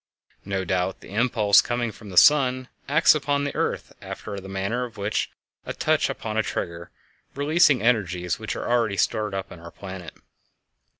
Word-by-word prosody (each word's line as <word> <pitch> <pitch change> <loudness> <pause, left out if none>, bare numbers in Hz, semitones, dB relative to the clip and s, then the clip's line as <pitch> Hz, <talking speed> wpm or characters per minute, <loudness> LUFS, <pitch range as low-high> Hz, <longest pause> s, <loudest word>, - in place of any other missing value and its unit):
No 95 -1 -2
doubt 90 +1 -1
the - - -12
impulse 110 -2 +4
coming 120 -1 -2
from 105 0 -13
the 90 - -7
sun 130 +3 +5 0.2
acts 155 +4 +6
upon 145 -1 0
the 145 - -2
earth - - -2
after 100 - -7
the 95 0 -10
manner 100 +6 -2
of 120 -2 -8
a 100 +1 -4
touch - - +2
upon - - -4
a - - +4
trigger, 85 0 -5 0.5
releasing 145 -2 +3
energies 90 -7 0
which - - -4
are - - -4
already 115 -4 +1
stored 105 -1 0
up 95 - -5
in 90 - -10
our 85 0 -10
planet. 95 -1 -9
105 Hz, 170 wpm, -24 LUFS, 95-125 Hz, 0.5 s, acts